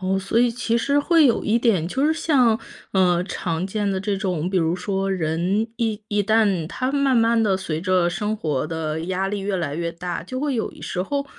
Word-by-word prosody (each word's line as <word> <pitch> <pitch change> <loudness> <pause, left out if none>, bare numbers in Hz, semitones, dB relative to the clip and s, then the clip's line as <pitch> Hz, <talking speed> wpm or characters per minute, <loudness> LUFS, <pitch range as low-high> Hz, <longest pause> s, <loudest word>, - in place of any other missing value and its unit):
哦， 190 +1 0
所 195 +4 0
以 245 0 +4
其 230 0 -1
实 280 +5 +1
会 320 0 +4
有 235 - +1
一 220 +2 +2
点， 200 -9 +2
就 265 +10 -1
是 315 - +3
像， 255 -9 +2 0.3
呃， 180 -2 +3
常 175 -2 -3
见 205 +1 -2
的 190 -1 -1
这 200 0 -1
种， 180 -4 -2
比 190 - 0
如 165 +1 +1
说 195 +1 -2
人 180 +5 0
一 220 -3 -2
一 205 0 +1
旦 200 -6 +2
他 255 +9 -2
慢 275 -3 +2
慢 230 0 +3
地 200 -4 +2
随 165 -4 -4
着 180 -2 +2
生 210 +3 -2
活 150 -6 -1
的 160 0 -3
压 190 +2 -1
力 205 0 -2
越 195 0 -2
来 160 -5 -2
越 170 0 -2
大， 175 0 -5
就 255 +6 -5
会 285 -4 -1
有 220 - -2
时 180 - -3
候 280 +7 -2
195 Hz, 235 characters per minute, -22 LUFS, 180-230 Hz, 0.3 s, 以